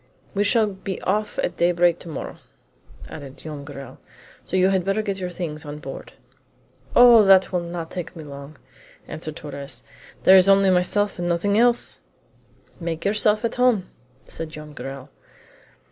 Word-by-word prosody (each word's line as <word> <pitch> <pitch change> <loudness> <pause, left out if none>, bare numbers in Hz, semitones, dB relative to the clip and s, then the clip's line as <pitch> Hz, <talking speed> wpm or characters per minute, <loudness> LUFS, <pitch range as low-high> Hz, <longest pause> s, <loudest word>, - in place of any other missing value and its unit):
"We 200 - +1
shall 220 +2 +4
be 195 -1 -5
off 210 +2 -1
at - - -2
daybreak 175 0 +3
to 170 - -9
morrow," 150 - -6 0.7
added 140 -3 -10
Joam 150 -3 -8
Garral, 140 -2 -10 0.4
"so - - -2
you 185 +1 +4
had 190 -2 +1
better 195 +3 0
get 200 -2 -3
your 180 -1 -3
things 165 -4 -5
on 145 0 -7
board." 150 - -9 0.8
"Oh, 240 -3 +8
that 190 -1 +5
will 180 - +1
not 170 -1 -6
take 180 0 -6
me 160 - -8
long!" 140 0 -10 0.5
answered 155 -1 -6
Torres; 140 -5 -7 0.4
"there 190 - +8
is 190 +1 +6
only 195 -1 +5
myself 185 +2 +1
and 175 0 -1
nothing 175 +4 +1
else!" 240 +2 +2 0.8
"Make 165 -1 -4
yourself 210 +1 +2
at 230 - -1
home," 225 -7 +2 0.3
said 165 - -6
Joam 150 -1 -10
Garral. 135 0 -8
175 Hz, 160 wpm, -23 LUFS, 155-195 Hz, 0.8 s, Oh